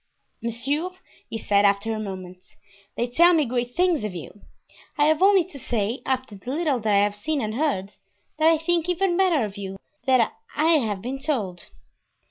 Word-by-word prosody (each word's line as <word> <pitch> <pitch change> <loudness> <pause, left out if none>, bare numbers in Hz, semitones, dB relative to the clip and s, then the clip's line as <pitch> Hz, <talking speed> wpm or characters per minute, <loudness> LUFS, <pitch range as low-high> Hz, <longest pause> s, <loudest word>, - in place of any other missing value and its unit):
"Monsieur," 270 +9 -1 0.4
he 225 - -4
said, 205 -2 +2
after 200 +2 +2
a 215 - -3
moment, 185 -3 -7 0.5
"they 240 - +1
tell 340 +9 +5
me 310 -3 +3
great 245 0 -2
things 355 -7 +2
of 210 -4 -4
you. 175 +5 -9 0.6
I 295 - +4
have 310 +1 +3
only 390 -1 +6
to 320 -5 -9
say, 230 0 -2
after 260 -4 -1
the 195 +5 -9
little 290 -2 0
that 215 -1 -1
I 200 - +5
have 205 0 0
seen 295 +8 -2
and 215 -4 -2
heard, 230 -8 -1 0.5
that 310 - +4
I 325 0 +5
think 340 +1 0
even 360 0 +1
better 345 - +3
of 205 -1 -8
you 195 -1 -6 0.3
than 255 -4 +5 0.3
I 305 - +1
have 210 -6 -3
been 260 +3 -4
told." 210 - -3
245 Hz, 190 wpm, -24 LUFS, 205-315 Hz, 0.6 s, only